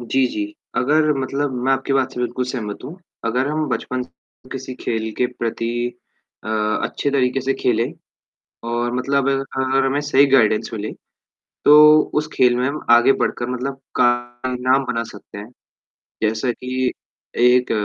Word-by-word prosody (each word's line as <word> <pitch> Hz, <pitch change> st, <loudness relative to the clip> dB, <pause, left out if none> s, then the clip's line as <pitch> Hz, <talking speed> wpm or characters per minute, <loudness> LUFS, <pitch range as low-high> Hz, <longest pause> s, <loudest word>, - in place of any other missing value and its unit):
जी, 130 Hz, +2 st, +1 dB
जी, 105 Hz, -4 st, -3 dB, 0.3 s
अगर 150 Hz, +4 st, +3 dB
मतलब 135 Hz, +1 st, -2 dB
मैं 135 Hz, -, +3 dB
आपकी 135 Hz, +1 st, -1 dB
बात 135 Hz, -1 st, +1 dB
से 125 Hz, -, -5 dB
बिल्कुल 125 Hz, +1 st, -2 dB
सहमत 115 Hz, -5 st, -5 dB
हूँ। 165 Hz, -, -8 dB, 0.3 s
अगर 125 Hz, +4 st, 0 dB
हम 155 Hz, 0 st, -1 dB
बचपन 130 Hz, 0 st, -2 dB
से 125 Hz, -, -19 dB
किसी 130 Hz, -1 st, -6 dB
खेल 110 Hz, -2 st, -3 dB
के 125 Hz, -, +2 dB
प्रति 120 Hz, 0 st, -3 dB, 0.5 s
अ, -, -, -6 dB, 0.4 s
अच्छे 140 Hz, -, -2 dB
तरीके 135 Hz, -1 st, +1 dB
से 135 Hz, +1 st, 0 dB
खेले 115 Hz, -1 st, +1 dB, 0.9 s
और 120 Hz, +1 st, -1 dB
मतलब 135 Hz, +2 st, +1 dB
अगर 135 Hz, 0 st, 0 dB
हमें 135 Hz, +2 st, +1 dB
सही 145 Hz, -1 st, +4 dB
गाइडेंस 115 Hz, -5 st, +3 dB
मिले, 105 Hz, -1 st, -4 dB, 0.7 s
तो 150 Hz, +1 st, +8 dB
उस 150 Hz, 0 st, 0 dB
खेल 125 Hz, -2 st, +4 dB
में 125 Hz, +1 st, 0 dB
हम 145 Hz, +2 st, -3 dB
आगे 120 Hz, +3 st, +6 dB
बढ़कर 120 Hz, -2 st, -2 dB
मतलब 125 Hz, +2 st, -3 dB, 0.3 s
का 125 Hz, -, +6 dB, 0.5 s
नाम 130 Hz, +2 st, +2 dB
बना 115 Hz, -2 st, -2 dB
सकते 100 Hz, 0 st, -12 dB
हैं, 105 Hz, +3 st, -8 dB, 0.7 s
जैसा 110 Hz, +3 st, +1 dB
की 130 Hz, +1 st, -2 dB, 0.5 s
एक 125 Hz, +1 st, +4 dB
125 Hz, 160 wpm, -20 LUFS, 120-135 Hz, 0.9 s, तो